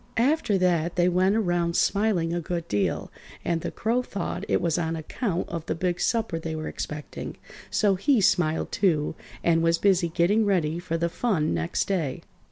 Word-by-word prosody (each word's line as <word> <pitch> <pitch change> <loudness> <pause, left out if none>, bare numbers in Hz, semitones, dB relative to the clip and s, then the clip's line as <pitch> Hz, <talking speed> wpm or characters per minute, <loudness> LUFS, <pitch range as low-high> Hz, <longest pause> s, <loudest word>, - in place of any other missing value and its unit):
After 250 -4 +2
that 175 -2 +1
they 175 0 +3
went 185 +3 +3
around 175 -5 +1
smiling 200 -5 +2
a 175 - -1
good 170 0 -4
deal, 105 -1 -1 0.3
and 170 -1 0
the - - -3
Crow 235 +3 0
thought 200 -5 -4
it - - +2
was 170 0 0
on 165 -1 -1
account 175 - -3
of 170 -2 -4
the - - -1
big 175 0 -1
supper 225 -8 0
they 160 -1 -4
were 155 0 -4
expecting, 150 0 -6 0.3
so 205 -2 +3
he 245 +7 +2
smiled, 170 -4 +2
too, 160 -7 +1 0.3
and 165 -1 +3
was 165 0 +3
busy 185 -2 +3
getting 180 +7 +2
ready 170 -5 +1
for 165 -1 -2
the 170 +1 0
fun 170 - 0
next 80 0 -1
day. 165 -9 -2
175 Hz, 180 wpm, -26 LUFS, 165-200 Hz, 0.3 s, they